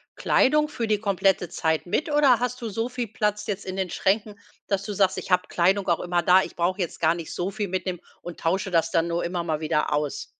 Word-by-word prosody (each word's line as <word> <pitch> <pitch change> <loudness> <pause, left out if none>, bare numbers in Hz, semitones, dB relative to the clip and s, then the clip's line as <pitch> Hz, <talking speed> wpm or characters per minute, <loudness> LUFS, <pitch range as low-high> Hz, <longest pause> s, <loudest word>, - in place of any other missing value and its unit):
Kleidung 300 +3 +3
für 235 -6 -3
die 210 -1 +1
komplette 195 -3 +1
Zeit 160 0 -1
mit 300 - -1
oder 280 -5 +5
hast 250 +1 -3
du 230 - -3
so 225 +4 -2
viel 245 -1 -4
Platz 210 -1 -1
jetzt 200 -1 -3
in 185 - -5
den 190 -1 -2
Schränken, 205 +1 0 0.3
dass 200 -1 0
du 210 +1 -5
sagst: 190 -1 +2
„Ich - - -9
habe 180 0 +3
Kleidung 190 +3 +1
auch 170 -2 +2
immer 175 -1 0
da. 185 +1 +6
Ich - - -8
brauche 180 +3 0
jetzt 175 - -4
gar 160 0 +4
nicht 170 -2 -7
so 180 +2 -2
viel 205 +1 -3
mitnehmen 185 -1 -3 0.2
und 175 -1 -9
tausche 190 +3 -1
das 165 -1 +2
dann 165 0 +2
nur 170 0 -1
immer 175 0 -2
mal 160 -2 -2
wieder 155 -1 0
aus?“ 150 -1 -2
190 Hz, 240 wpm, -25 LUFS, 175-210 Hz, 0.3 s, da